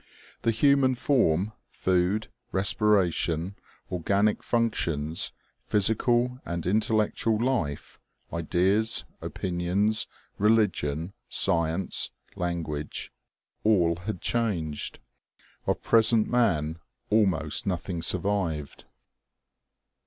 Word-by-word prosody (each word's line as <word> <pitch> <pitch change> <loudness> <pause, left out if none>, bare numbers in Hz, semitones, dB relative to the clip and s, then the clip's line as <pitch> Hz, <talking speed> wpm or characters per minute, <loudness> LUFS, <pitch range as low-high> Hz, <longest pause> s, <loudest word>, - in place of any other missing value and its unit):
The - - +1
human 130 +3 +3
form, 110 - +2 0.2
food, 95 +4 0 0.2
respiration, 95 -3 +1 0.4
organic 100 +4 +1
functions, 85 -10 0 0.3
physical 120 +4 +1
and 85 -1 -4
intellectual 110 +2 +1
life, 115 - -2 0.3
ideas, 95 +7 +1 0.2
opinions, 95 +4 -1 0.3
religion, 95 -6 +1 0.2
science, 85 +2 +1 0.3
language 80 -4 -4 0.5
all 90 -6 +3
had 90 +1 -5
changed. 90 -11 -1 0.7
Of - - 0
present 115 -1 +5
man 85 -10 +1 0.3
almost 95 -7 +2
nothing 90 -2 -2
survived. 85 -4 -1
95 Hz, 75 wpm, -27 LUFS, 85-110 Hz, 0.7 s, present